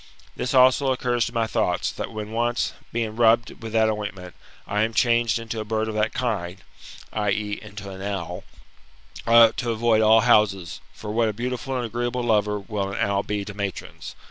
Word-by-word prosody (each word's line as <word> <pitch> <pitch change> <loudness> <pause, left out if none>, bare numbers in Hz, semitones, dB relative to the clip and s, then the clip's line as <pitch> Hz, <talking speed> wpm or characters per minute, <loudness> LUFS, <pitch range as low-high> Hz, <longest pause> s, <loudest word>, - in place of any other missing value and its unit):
This 130 - -2
also 130 +1 +5
occurs 125 -3 0
to - - -6
my 115 -1 +2
thoughts, 110 - 0
that - - -6
when 110 -1 -6
once, 120 +1 0 0.2
being 110 -2 -2
rubbed 115 +1 +2
with 115 -1 -6
that 110 -1 +4
ointment, 105 -4 -4 0.3
I 105 +1 -1
am 110 +1 0
changed 115 -2 +3
into 115 -1 -5
a - - -2
bird 110 +1 -1
of 110 - -3
that 110 0 0
kind 100 -8 -3 0.5
[i.e. 105 0 -1
into 105 -1 -9
an 95 0 -9
owl], 100 -4 -4 0.8
I 115 - +4
ought 115 -1 +7
to 120 - -2
avoid 115 -1 +2
all 110 +1 +6
houses; 105 -6 +2
for 105 - -7
what 115 0 +2
a - - -3
beautiful 125 +3 -3
and 125 - -2
agreeable 120 +2 -2
lover 105 -3 +1
will 100 -1 -3
an 100 - -5
owl 100 -1 +1
be 105 -1 -3
to 105 - -7
matrons! 100 -2 -6
110 Hz, 195 wpm, -24 LUFS, 105-120 Hz, 0.8 s, ought